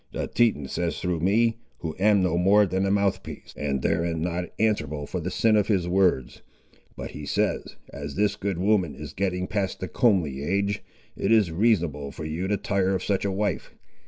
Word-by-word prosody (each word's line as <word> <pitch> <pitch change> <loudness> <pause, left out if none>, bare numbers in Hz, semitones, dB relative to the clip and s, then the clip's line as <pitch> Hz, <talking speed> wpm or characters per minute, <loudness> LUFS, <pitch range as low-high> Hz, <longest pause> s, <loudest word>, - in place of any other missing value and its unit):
The - - -2
Teton 110 - +1
says 85 +3 -2
through 90 -2 -1
me, 115 +6 +2 0.2
who 80 -2 -4
am 100 -1 +4
no 90 -2 +1
more 100 +4 +5
than 95 +1 0
a - - +1
mouthpiece, 100 -1 -1
and 70 -3 -2
therein 85 0 0
not 90 0 -2
answerable 90 -10 0
for 90 - -4
the 85 +2 -3
sin 110 +4 +2
of 105 -2 +2
his 95 -5 +1
words, 90 -8 +1 0.6
but - - -6
he 75 - -8
says, 70 - -1 0.2
as 70 0 -6
this 105 +1 +1
good 100 -3 -3
woman 95 -3 +1
is - - -8
getting 90 -1 -1
past 100 -1 -2
the 95 - -4
comely 90 - +1
age, 100 +6 -1 0.3
it - - -1
is 105 -7 +4
reasonable 85 -7 +1
for 75 - -7
you 80 +4 -3
to 105 +1 +1
tire 95 -1 0
of - - -3
such 100 -1 0
a 100 - 0
wife. 100 -1 -2
95 Hz, 195 wpm, -25 LUFS, 85-100 Hz, 0.6 s, more